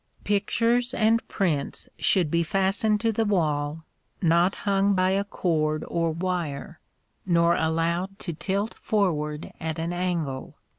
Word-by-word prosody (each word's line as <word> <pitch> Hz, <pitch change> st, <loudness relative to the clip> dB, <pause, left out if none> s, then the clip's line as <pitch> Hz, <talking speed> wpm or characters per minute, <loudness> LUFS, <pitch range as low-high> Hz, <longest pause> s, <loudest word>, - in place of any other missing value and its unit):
Pictures 230 Hz, +4 st, +1 dB
and 225 Hz, +1 st, +3 dB
prints 160 Hz, -8 st, -1 dB
should 175 Hz, -6 st, +3 dB
be 170 Hz, -, +2 dB
fastened 195 Hz, +5 st, +1 dB
to 230 Hz, -1 st, +2 dB
the 225 Hz, +1 st, 0 dB
wall, 155 Hz, -6 st, 0 dB, 0.4 s
not 170 Hz, +2 st, +3 dB
hung 200 Hz, 0 st, +3 dB
by 185 Hz, 0 st, +2 dB
a 195 Hz, +1 st, +1 dB
cord 155 Hz, -6 st, -1 dB
or 165 Hz, -1 st, 0 dB
wire, 165 Hz, -3 st, -3 dB, 0.4 s
nor 170 Hz, -1 st, +3 dB
allowed 170 Hz, +4 st, 0 dB
to 170 Hz, -, -5 dB
tilt 200 Hz, +6 st, -2 dB
forward 150 Hz, -7 st, -1 dB
at 160 Hz, 0 st, -3 dB
an 165 Hz, +2 st, -2 dB
angle. 170 Hz, -7 st, -2 dB
175 Hz, 135 wpm, -26 LUFS, 160-200 Hz, 0.4 s, and